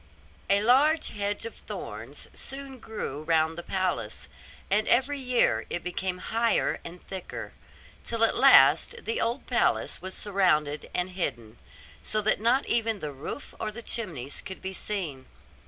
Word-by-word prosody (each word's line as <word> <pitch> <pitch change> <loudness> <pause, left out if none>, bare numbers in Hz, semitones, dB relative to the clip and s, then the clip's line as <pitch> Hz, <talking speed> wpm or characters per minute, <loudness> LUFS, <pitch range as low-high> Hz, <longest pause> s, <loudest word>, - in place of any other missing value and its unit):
A 200 +1 +4
large 285 +7 +4
hedge 205 +1 -2
of 230 - -5
thorns 120 - -7
soon 270 -1 -6
grew 215 -11 -5
round 160 0 +2
the 170 - -5
palace, 185 +1 -2 0.4
and 210 +2 +3
every 270 +4 +3
year 240 - +2
it 175 - -3
became 180 +1 -2
higher 230 +4 +1
and 175 +1 -10
thicker; 190 -2 -7 0.5
till 230 -1 -1
at 225 - +4
last 160 - +6
the 225 - -1
old 235 +4 -1
palace - - +1
was 185 0 -5
surrounded 155 -8 +1
and 180 +1 0
hidden, 120 - -3 0.4
so 215 - -1
that 210 0 +1
not 245 +5 +3
even 225 -2 +1
the 150 -6 -5
roof 140 - -7
or 215 - -2
the 225 +3 -8
chimneys 160 - -2
could 190 - -7
be 190 0 -5
seen. 170 -11 -4
195 Hz, 155 wpm, -28 LUFS, 160-230 Hz, 0.5 s, last